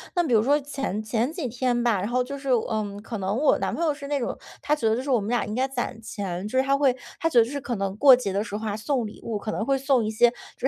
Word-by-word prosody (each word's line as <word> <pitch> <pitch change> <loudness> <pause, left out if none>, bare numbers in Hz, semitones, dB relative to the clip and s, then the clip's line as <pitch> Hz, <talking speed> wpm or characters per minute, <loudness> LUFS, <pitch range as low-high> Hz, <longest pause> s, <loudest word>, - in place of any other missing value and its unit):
那 350 - +3
比 280 - -2
如 220 -2 +5
说， 285 +4 +3
前 275 -7 -4
前 230 +6 -1
几 330 -7 -3
天 240 0 0
吧， 235 -4 +2
然 200 - -2
后 250 +1 +1
就 280 +2 -6
是， 275 0 -6
呃， 220 -3 +1 0.2
可 225 0 -5
能 195 +1 -2
我 285 +6 +3
男 - - -2
朋 - - -2
友 320 - +3
是 285 -1 -7
那 285 0 0
种， 240 - -3 0.2
他 300 - +1
觉 270 -7 -1
得 220 - +3
就 245 - -2
是 275 - -6
我 250 - +4
们 205 - -4
俩 245 - +1
应 210 - -5
该 260 +2 +1
攒 250 -4 -4
钱。 195 -3 -4
就 260 +4 0
是 - - +3
他 275 +1 +2
会 270 -3 +3 0.2
他 330 - +1
觉 250 -7 +4
得 225 - +5
就 - - -8
是 285 +1 -3
可 250 - -4
能 195 0 -2
过 270 0 +8
节 245 -6 -3
的 200 +2 0
时 205 - -6
候 215 +1 -4
啊 210 0 -2
送 245 0 -1
礼 210 - -11
物， 220 -3 -3
可 215 - -4
能 220 - -2
会 275 +1 +2
送 270 -3 +2
一 215 - -1
些 240 +2 +5 0.3
就 260 - -1
245 Hz, 350 characters per minute, -25 LUFS, 215-275 Hz, 0.3 s, 过